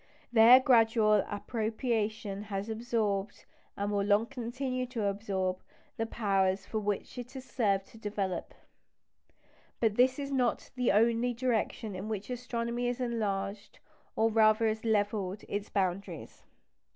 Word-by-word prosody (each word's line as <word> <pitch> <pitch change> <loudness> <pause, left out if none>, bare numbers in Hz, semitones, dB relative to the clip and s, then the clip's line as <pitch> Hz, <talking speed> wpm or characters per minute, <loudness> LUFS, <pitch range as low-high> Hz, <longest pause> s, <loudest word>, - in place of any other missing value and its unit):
Their 235 +3 +9
gradual 225 -5 +4
appropriation 215 -1 -2
has 200 +1 -4
absorbed, 220 -3 -2 0.3
and 200 +1 -1
will 200 -1 +1
long 205 +2 +3
continue 255 +2 -3
to 235 -4 -3
absorb, 195 -2 -1 0.4
the 225 - -2
powers 195 -3 +1
which 210 +3 -2
it 245 +1 -7
has 265 -1 -8
served 200 -7 0
to 225 - -15
develop. 200 -4 -3 1.2
But 220 -3 +1
this 255 +1 +4
is 280 -1 -4
not 250 -4 0
the 250 -1 +1
only 230 +3 +2
direction 230 -3 -1
in 195 +4 -5
which 210 +2 -4
astronomy 240 -1 -2
has 245 0 -2
enlarged, 205 -4 -3 0.4
or 225 +1 +2
rather 220 0 +4
has 220 0 -2
levelled, 205 -3 0
its 205 0 -4
boundaries. 190 -1 -3
220 Hz, 130 wpm, -30 LUFS, 205-235 Hz, 1.2 s, Their